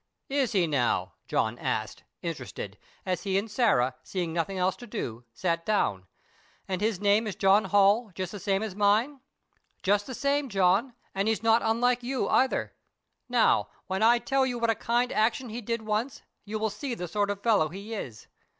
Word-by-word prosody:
"Is 270 -4 0
he, 185 -4 +3
now?" 140 -6 0
John - - 0
asked, - - -3 0.2
interested, - - -6 0.3
as 185 -2 -1
he 195 -2 0
and 210 +2 -2
Sarah, 195 - +2
seeing 175 -4 -3
nothing 175 +3 -1
else 185 +1 +1
to 245 - -10
do, 120 - -5
sat 165 +6 -1
down. 100 - 0 0.6
"And 185 0 -2
his 215 -3 0
name 205 +2 +3
is 205 - -4
John 195 +2 +4
Holl, 205 +4 +4
just 185 -1 -4
the 205 - -7
same 195 +1 0
as 215 -4 -4
mine?" 210 +8 +2 0.6
"Just 205 +1 +2
the 260 - -5
same, 280 +1 0
John, 200 +5 +2 0.2
and 195 +2 0
he's 225 0 0
not 225 +1 +4
unlike 245 +2 +2
you 255 +2 -1
either. 260 0 +2 0.6
Now, - - +3 0.2
when 190 +1 -2
I 235 +2 +6
tell 270 +2 +1
you 250 -2 -1
what 230 -1 +2
a - - -1
kind 240 +3 0
action 230 +3 +1
he 230 +3 -5
did 230 0 -3
once, 215 +5 -2 0.2
you 215 +1 -3
will 220 0 -1
see 240 +4 -4
the 180 -5 -5
sort 205 +3 0
of 200 0 -4
fellow 205 -9 +3
he 200 +6 -8
is. 125 - -6
210 Hz, 190 wpm, -28 LUFS, 190-235 Hz, 0.6 s, I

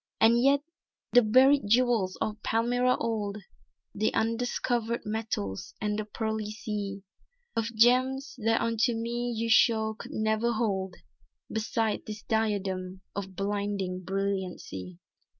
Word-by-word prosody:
"And 235 +2 +5
yet 275 +2 +4 0.5
the 245 - +8
buried 260 +3 +5
jewels 230 -4 +3
of 215 0 -2
Palmyra 245 +2 +2
old, 215 -3 -2 0.6
The 215 +2 +1
undiscovered 235 0 0
metals 210 - -3
and 210 0 -1
the 215 - -3
pearly 220 0 -3
sea 205 -3 -4 0.5
Of 230 - +1
gems, 255 +4 +3
that 225 0 +3
unto 230 +1 +1
me 240 +1 -2
you 230 0 -2
show 220 -1 +4
could 215 - -10
never 220 +2 +1
hold 195 -5 -1 0.6
Beside 220 0 -1
this 210 -1 -7
diadem 190 -4 -1
of 190 -1 -5
blinding 200 -2 -2
brilliancy." 190 - -3
220 Hz, 120 wpm, -28 LUFS, 200-235 Hz, 0.6 s, the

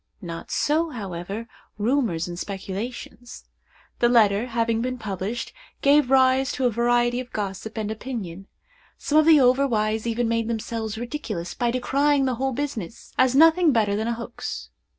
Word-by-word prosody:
Not 165 -1 -7
so, 320 +3 +1
however, 200 - -6 0.3
rumors 215 - 0
and 175 0 -6
speculations. 210 +5 -6 0.5
The 240 - +4
letter, 220 -1 +4
having 230 -1 0
been 255 +1 -2
published, 210 +1 -4 0.3
gave 285 -1 +5
rise 265 0 +4
to 265 - -1
a 245 - +3
variety 240 +1 +2
of 255 -1 -7
gossip 205 +2 -5
and 215 -1 -2
opinion. 210 -6 -6 0.5
Some 305 +1 +2
of 310 - +3
the 315 -2 +8
over 260 +2 +4
wise 220 -1 0
even 235 +1 0
made 230 -1 0
themselves 225 -1 -3
ridiculous 230 - -5
by 240 - 0
decrying 275 +3 +2
the 260 - 0
whole 270 0 +1
business; 240 -7 -5
as 260 0 +4
nothing 325 +2 +6
better 215 -5 +2
than 220 +2 -2
a 235 - 0
hoax. 235 +1 -6
235 Hz, 160 wpm, -24 LUFS, 215-260 Hz, 0.5 s, the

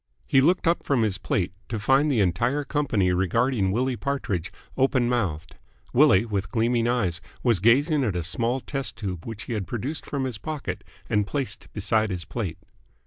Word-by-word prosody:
He 135 - +4
looked 175 +7 +3
up 170 - +3
from 130 -5 +1
his 100 -4 0
plate, 90 -1 -1 0.2
to 115 - -2
find 135 +8 +3
the 125 -7 +2
entire 120 - +1
company 135 -11 +1
regarding 95 +4 +1
Willie 125 +4 0
Partridge 115 - -2 0.2
open 130 -2 +2
mouthed. 100 -11 -2 0.4
Willie, 95 +4 +5
with 100 -3 -2
gleaming 115 0 +1
eyes, 95 -9 0 0.2
was 115 -6 +3
gazing 140 - +4
at 105 -7 0
a 85 - -1
small 115 +9 -1
test 135 -3 -3
tube 95 -5 -5
which 115 -2 -6
he 120 - -5
had 105 -4 -3
produced 130 +7 -4
from 140 -2 -2
his 125 -5 -3
pocket 105 - -5 0.2
and 105 -3 +1
placed 140 0 -4
beside 110 +1 +1
his 90 -3 -4
plate. 95 -9 -4
115 Hz, 180 wpm, -25 LUFS, 95-135 Hz, 0.4 s, Willie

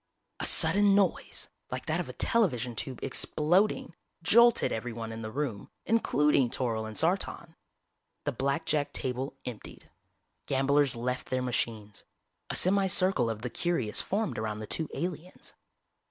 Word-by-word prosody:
A - - 0
sudden 205 0 +5
noise, 200 -2 0 0.2
like - - -5
that - - -1
of - - -4
a - - -7
television 125 - +1
tube 130 +1 -5
exploding, 170 +9 +1 0.3
jolted 235 +5 +5
everyone 115 0 -4
in 110 0 -6
the 110 - -5
room, 120 -4 -4 0.2
including 150 - +2
Toryl 115 -3 -2
and 110 - -8
Sartan. 170 -1 -1 0.7
The 145 - -1
blackjack 145 +2 -1
table 130 +1 -3
emptied. 120 -4 -9 0.6
Gamblers 140 0 +2
left 125 +2 -3
their 130 0 -1
machines. 110 -4 -3 0.5
A - - -3
semi 195 +1 +4
circle 185 -10 +1
of 110 0 -5
the 125 - -3
curious 170 -12 0
formed 210 - -2
around 110 -1 -3
the 110 - -6
two 160 +7 -3
aliens. 175 0 -6
135 Hz, 140 wpm, -29 LUFS, 115-175 Hz, 0.7 s, sudden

